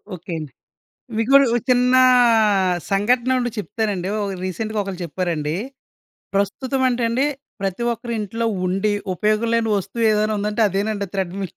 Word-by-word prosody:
Okay 180 Hz, +1 st, -10 dB
అండి. 150 Hz, -4 st, -8 dB, 0.7 s
మీకు 225 Hz, +4 st, 0 dB
ఒక 240 Hz, -4 st, +4 dB
చిన్న 250 Hz, +1 st, +3 dB, 1.0 s
సంఘటనొకటి 245 Hz, +4 st, +1 dB
చెప్తానండి. 205 Hz, -3 st, -2 dB
ఒకరు 195 Hz, -2 st, -4 dB
రీసెంట్‌గా 215 Hz, +4 st, -3 dB
ఒకళ్ళు 190 Hz, -2 st, -6 dB
చెప్పారండి. 165 Hz, -3 st, -2 dB, 0.8 s
ప్రస్తుతం 255 Hz, +7 st, -1 dB
అంట 250 Hz, -1 st, 0 dB
అండి, 260 Hz, +5 st, +1 dB, 0.4 s
ప్రతి 195 Hz, +4 st, -2 dB
ఒక్కరి 235 Hz, +1 st, -6 dB
ఇంట్లో 225 Hz, +3 st, -3 dB, 0.2 s
ఉండి 195 Hz, +3 st, 0 dB, 0.2 s
ఉపయోగం 215 Hz, +4 st, +1 dB
లేని 230 Hz, -1 st, +1 dB
వస్తువు 200 Hz, +5 st, -3 dB
ఏదైనా 215 Hz, 0 st, +1 dB
ఉందంటే 210 Hz, +2 st, -1 dB
అదేనంట 200 Hz, +2 st, -1 dB
థ్రెడ్‌మిల్ 190 Hz, 0 st, -3 dB
210 Hz, 130 wpm, -21 LUFS, 190-235 Hz, 1.0 s, ఒక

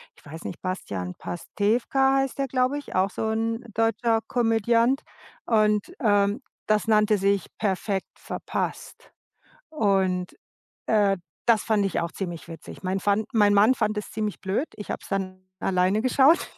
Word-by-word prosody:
ich -, -, -22 dB
weiß 160 Hz, +3 st, -9 dB
nicht, -, -, -7 dB
Bastian 95 Hz, -, -4 dB
Pastewka 245 Hz, +9 st, +1 dB
heißt 270 Hz, 0 st, -1 dB
der, 275 Hz, -, 0 dB
glaube 255 Hz, +2 st, +1 dB
ich, 290 Hz, -, -8 dB
auch 190 Hz, +1 st, +2 dB
so 220 Hz, +3 st, -3 dB
'n 225 Hz, +1 st, -1 dB
deutscher 225 Hz, +1 st, +2 dB
Komödiant. 235 Hz, +3 st, +2 dB, 0.4 s
Und, 215 Hz, -, +2 dB
ähm, 205 Hz, +1 st, +2 dB, 0.3 s
das 215 Hz, +1 st, +2 dB
nannte 215 Hz, -1 st, +4 dB
sich 200 Hz, 0 st, +1 dB
„Perfekt 195 Hz, -1 st, -1 dB
Verpasst.“ -, -, -5 dB, 0.6 s
Und, 190 Hz, -, 0 dB, 0.5 s
äh, 205 Hz, -3 st, +3 dB, 0.3 s
das 225 Hz, -3 st, +4 dB
fand 215 Hz, -3 st, +2 dB
ich 195 Hz, -, -1 dB
auch 170 Hz, -1 st, -3 dB
ziemlich 175 Hz, -4 st, -5 dB
witzig. 165 Hz, +2 st, -10 dB
Mein 190 Hz, +1 st, -1 dB
fand 205 Hz, +2 st, +1 dB
mein 205 Hz, -2 st, +4 dB
Mann 210 Hz, +5 st, +6 dB
fand 215 Hz, -2 st, 0 dB
es 210 Hz, -, -4 dB
ziemlich 210 Hz, -2 st, -3 dB
blöd. 200 Hz, +11 st, -1 dB
Ich 210 Hz, -, -9 dB
habe -, -, -3 dB
es -, -, -13 dB
dann 185 Hz, -1 st, -3 dB, 0.2 s
alleine 185 Hz, +3 st, +2 dB
geschaut. 265 Hz, +6 st, +4 dB
210 Hz, 155 wpm, -25 LUFS, 195-230 Hz, 0.6 s, Mann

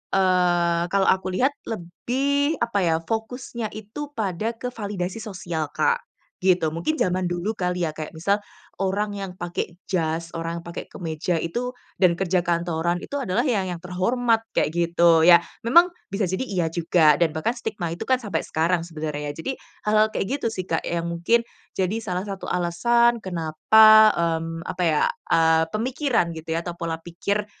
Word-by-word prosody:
eee, 175 Hz, -2 st, +3 dB
kalau 195 Hz, +1 st, +2 dB
aku 190 Hz, 0 st, +2 dB
lihat 250 Hz, +10 st, +1 dB, 0.2 s
lebih 270 Hz, -, -1 dB
apa 235 Hz, -3 st, 0 dB
ya, 165 Hz, -3 st, +2 dB
fokusnya 225 Hz, +1 st, -4 dB
itu 220 Hz, +8 st, -7 dB
pada 210 Hz, 0 st, -1 dB
ke 250 Hz, +1 st, -5 dB
validasi 205 Hz, -2 st, -4 dB
sosial 175 Hz, -8 st, -4 dB
Kak, 475 Hz, 0 st, +1 dB, 0.4 s
gitu. 180 Hz, -4 st, +2 dB
Mungkin 170 Hz, -, -1 dB
zaman 185 Hz, -, 0 dB
dulu 175 Hz, +5 st, -2 dB
kali 180 Hz, -3 st, -1 dB
ya, 155 Hz, -, -3 dB
kayak 155 Hz, +1 st, -7 dB
misal 200 Hz, +5 st, +1 dB, 0.4 s
orang 195 Hz, +2 st, 0 dB
yang 195 Hz, -2 st, -5 dB
pakai 175 Hz, -1 st, -4 dB, 0.2 s
jas, 165 Hz, -2 st, -1 dB
orang 165 Hz, +1 st, -4 dB
pakai 170 Hz, 0 st, -7 dB
kemeja 165 Hz, 0 st, -3 dB
itu 240 Hz, +9 st, -3 dB, 0.2 s
dan 180 Hz, -3 st, +4 dB
kerja 180 Hz, 0 st, 0 dB
kantoran 170 Hz, 0 st, 0 dB
itu 285 Hz, -, -5 dB
adalah 235 Hz, -5 st, 0 dB
ya 215 Hz, -8 st, +1 dB
yang 175 Hz, -2 st, -5 dB
terhormat 225 Hz, +6 st, 0 dB
kayak -, -, +2 dB
gitu 170 Hz, -1 st, +4 dB
ya. 170 Hz, 0 st, +8 dB, 0.2 s
Memang 340 Hz, +10 st, +6 dB, 0.2 s
bisa 195 Hz, -2 st, 0 dB
jadi 190 Hz, +8 st, -2 dB
iya 180 Hz, -8 st, -1 dB
juga, 160 Hz, -2 st, +3 dB
dan 165 Hz, -2 st, +1 dB
bahkan 195 Hz, +10 st, -1 dB
stigma 205 Hz, -6 st, -4 dB
itu 170 Hz, +6 st, -5 dB
kan 260 Hz, +1 st, +2 dB
sampai 200 Hz, -8 st, -2 dB
sekarang 165 Hz, +1 st, 0 dB
sebenarnya. 150 Hz, -3 st, -4 dB
Jadi 165 Hz, -, -4 dB, 0.3 s
hal-hal 215 Hz, +1 st, +3 dB
kayak -, -, -1 dB
gitu 235 Hz, -, -1 dB
sih 185 Hz, -4 st, -4 dB
Kak 165 Hz, -, -1 dB
yang 170 Hz, 0 st, -2 dB
mungkin 170 Hz, +8 st, +2 dB, 0.3 s
jadi 190 Hz, +3 st, -1 dB
salah 185 Hz, -4 st, -2 dB
satu 195 Hz, -1 st, -6 dB
alasan 235 Hz, +8 st, +2 dB
kenapa, 215 Hz, +6 st, +6 dB
mmm, 165 Hz, 0 st, -1 dB
apa 180 Hz, 0 st, -2 dB
ya, 155 Hz, -2 st, +2 dB, 0.3 s
ah, 160 Hz, 0 st, +4 dB
pemikiran 240 Hz, -, 0 dB
gitu 160 Hz, 0 st, -4 dB
ya 165 Hz, -, 0 dB
atau 175 Hz, 0 st, -6 dB
pola 165 Hz, -1 st, -4 dB
pikir 200 Hz, +5 st, -2 dB
180 Hz, 165 wpm, -24 LUFS, 170-220 Hz, 0.4 s, ya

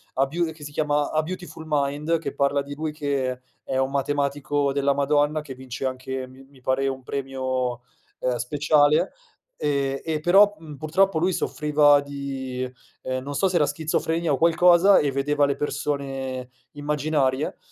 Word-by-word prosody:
a 135 Hz, +1 st, +2 dB
beau 165 Hz, +3 st, -1 dB
che 155 Hz, -1 st, -13 dB
si 145 Hz, -, -7 dB
chiama 145 Hz, -1 st, 0 dB
A 155 Hz, -, +2 dB
Beautiful 175 Hz, -1 st, -7 dB
Mind, 150 Hz, +2 st, 0 dB
che 145 Hz, -4 st, -5 dB
parla 140 Hz, 0 st, +2 dB
di 140 Hz, +1 st, -7 dB
lui 155 Hz, +1 st, -3 dB
che 140 Hz, -4 st, -2 dB, 0.2 s
è 130 Hz, -, -2 dB
un 130 Hz, 0 st, +1 dB
matematico 140 Hz, 0 st, 0 dB
della 140 Hz, 0 st, +2 dB
madonna, 145 Hz, +2 st, +1 dB
che 140 Hz, -3 st, -9 dB
vince 130 Hz, 0 st, -6 dB
anche, 130 Hz, 0 st, -4 dB
mi 130 Hz, +1 st, -15 dB
mi 135 Hz, -2 st, -21 dB
pare, 130 Hz, +2 st, +1 dB
un 135 Hz, -1 st, -3 dB
premio, 130 Hz, -2 st, -3 dB, 0.4 s
ehm, 125 Hz, -1 st, 0 dB
speciale, 145 Hz, +4 st, +2 dB, 0.4 s
e 140 Hz, -2 st, -1 dB
e 160 Hz, -2 st, -1 dB
però, 195 Hz, +6 st, +5 dB
mhmm, 155 Hz, -2 st, -10 dB
purtroppo 170 Hz, +5 st, +2 dB
lui 175 Hz, +4 st, +2 dB
soffriva 150 Hz, -2 st, +3 dB
di, 135 Hz, -2 st, -5 dB, 0.3 s
ehm, 130 Hz, 0 st, -3 dB
non 145 Hz, +1 st, -5 dB
so, 195 Hz, -, +2 dB
se 185 Hz, -, -3 dB
era 150 Hz, -, +4 dB
schizofrenia 160 Hz, +2 st, -1 dB
o 140 Hz, -, +2 dB
qualcosa 175 Hz, +4 st, +6 dB
e 145 Hz, -, +1 dB
vedeva 145 Hz, +2 st, +1 dB
le 140 Hz, 0 st, 0 dB
persone 135 Hz, -3 st, -3 dB, 0.2 s
immaginarie, 145 Hz, -1 st, 0 dB
145 Hz, 165 wpm, -24 LUFS, 135-150 Hz, 0.4 s, qualcosa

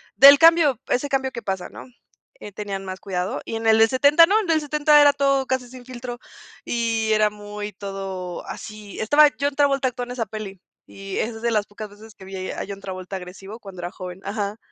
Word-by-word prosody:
del 280 Hz, +1 st, +10 dB
cambio, 325 Hz, -7 st, +5 dB
ese 270 Hz, +4 st, 0 dB
cambio 265 Hz, -1 st, 0 dB
que 235 Hz, -, -7 dB
pasa, 190 Hz, -3 st, -4 dB
¿no?, -, -, -11 dB, 0.5 s
eh, 210 Hz, -, -9 dB
tenían 195 Hz, -1 st, -5 dB
más 185 Hz, 0 st, -6 dB
cuidado. 185 Hz, -2 st, -3 dB
Y -, -, -6 dB
en 225 Hz, 0 st, -3 dB
el 220 Hz, 0 st, +6 dB
del 225 Hz, 0 st, +6 dB
70 285 Hz, +6 st, +6 dB
no. 400 Hz, +5 st, +2 dB
El 420 Hz, -, -3 dB
del 320 Hz, -1 st, +3 dB
70 300 Hz, 0 st, +4 dB
era 290 Hz, -1 st, +6 dB
todo 275 Hz, -1 st, +1 dB
casi 260 Hz, -1 st, -2 dB
sin 250 Hz, -1 st, -12 dB
filtro. 245 Hz, -1 st, -7 dB, 0.5 s
Y 225 Hz, -2 st, -1 dB
era 215 Hz, 0 st, +3 dB
muy, 210 Hz, 0 st, -7 dB
todo 195 Hz, -2 st, -6 dB
así. 210 Hz, -2 st, -9 dB
Estaba 290 Hz, +8 st, +6 dB
John 285 Hz, +1 st, 0 dB
Travolta, 275 Hz, -2 st, +2 dB
actúa 245 Hz, 0 st, -6 dB
en 245 Hz, -, -9 dB
esa 245 Hz, -2 st, -2 dB
peli. 205 Hz, -2 st, -8 dB, 0.3 s
Y 195 Hz, 0 st, -7 dB
es 225 Hz, 0 st, -3 dB
de 235 Hz, -, +1 dB
las 210 Hz, -2 st, 0 dB
pocas 210 Hz, +1 st, -9 dB
veces, 215 Hz, +1 st, -15 dB
que 190 Hz, -, -14 dB
vi 190 Hz, -1 st, -6 dB
a -, -, -5 dB
John 200 Hz, -1 st, -8 dB
Travolta, 185 Hz, 0 st, -7 dB
agresivo 195 Hz, +4 st, -10 dB
cuando 195 Hz, -5 st, -10 dB
era 175 Hz, +1 st, -5 dB
joven. 180 Hz, -1 st, -8 dB
Ajá. 205 Hz, 0 st, -3 dB
220 Hz, 215 wpm, -23 LUFS, 195-265 Hz, 0.5 s, del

